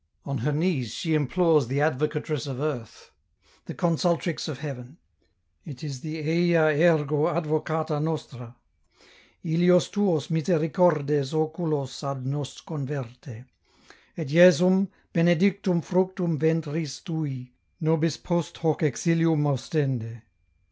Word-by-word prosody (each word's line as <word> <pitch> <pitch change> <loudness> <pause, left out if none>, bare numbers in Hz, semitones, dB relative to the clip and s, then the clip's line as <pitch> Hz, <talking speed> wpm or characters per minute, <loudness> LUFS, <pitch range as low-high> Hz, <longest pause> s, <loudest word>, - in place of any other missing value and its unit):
On 140 -2 -3
her 140 +7 -1
knees 145 - -1
she 160 -2 -2
implores 155 -1 +2
the 135 +3 -2
Advocatress 150 0 -1
of 130 -2 -5
earth, 135 -7 -5 0.5
the - - -7
Consultrix 170 -1 0
of 150 -4 -5
heaven; 135 0 -8 0.7
it 135 -2 -10
is 140 -4 -6
the 160 0 -5
" - - -6
Eia 165 -1 +3
ergo 155 -3 +3
Advocata 155 -1 -1
nostra; 130 -6 -5 0.9
illos 175 +2 +3
tuos 180 -8 0
misericordes 160 -4 +1
oculos 155 -4 -2
ad 140 -2 -4
nos 140 0 -5
converte; 130 -5 -7 0.7
et 160 -4 -4
Jesum, 180 +4 +6 0.3
benedictum 175 +1 +2
fructum 185 -3 0
ventris 160 -3 -1
tui, 140 -7 -5 0.3
nobis 160 -1 +1
post 175 -3 -2
hoc 160 -2 0
exihum 165 +1 +2
ostende." 130 -5 -2
155 Hz, 115 wpm, -25 LUFS, 140-170 Hz, 0.9 s, Jesum